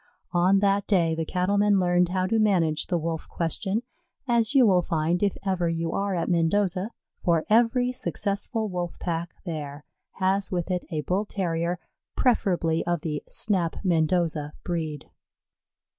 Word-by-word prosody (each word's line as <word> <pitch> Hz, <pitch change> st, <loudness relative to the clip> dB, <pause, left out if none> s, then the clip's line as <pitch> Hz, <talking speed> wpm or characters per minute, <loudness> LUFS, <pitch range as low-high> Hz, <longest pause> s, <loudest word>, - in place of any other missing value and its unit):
On 185 Hz, +3 st, +4 dB
that 200 Hz, 0 st, +2 dB
day 170 Hz, -5 st, +3 dB
the 160 Hz, 0 st, -2 dB
Cattlemen 200 Hz, +2 st, +2 dB
learned 175 Hz, -1 st, +3 dB
how 185 Hz, 0 st, 0 dB
to 225 Hz, +4 st, +1 dB
manage 175 Hz, -8 st, +2 dB
the 175 Hz, -, +1 dB
Wolf 165 Hz, 0 st, -4 dB
question, 190 Hz, +6 st, -2 dB, 0.4 s
as 235 Hz, +2 st, +2 dB
you 260 Hz, -3 st, +7 dB
will 185 Hz, -4 st, +4 dB
find 165 Hz, +1 st, 0 dB
if 200 Hz, -2 st, +1 dB
ever 180 Hz, -3 st, +1 dB
you 165 Hz, 0 st, -2 dB
are 200 Hz, -1 st, -1 dB
at 170 Hz, -, -1 dB
Mendoza; 185 Hz, +3 st, +1 dB, 0.3 s
for 170 Hz, -2 st, +2 dB
every 240 Hz, +2 st, +4 dB
successful 215 Hz, -1 st, -2 dB
Wolf 175 Hz, -3 st, -4 dB
pack 170 Hz, 0 st, -3 dB
there 150 Hz, -3 st, -5 dB, 0.3 s
has 190 Hz, +1 st, 0 dB
with 180 Hz, 0 st, -2 dB
it 180 Hz, -1 st, -1 dB
a 155 Hz, -4 st, -2 dB
Bull 185 Hz, +7 st, -1 dB
terrier, 175 Hz, -3 st, -1 dB, 0.4 s
preferably 175 Hz, -9 st, +2 dB
of 175 Hz, -2 st, 0 dB
the 150 Hz, -2 st, -3 dB
Snap 185 Hz, -6 st, 0 dB
Mendoza 160 Hz, -3 st, +1 dB
breed. 160 Hz, -4 st, -3 dB
180 Hz, 150 wpm, -26 LUFS, 165-200 Hz, 0.4 s, you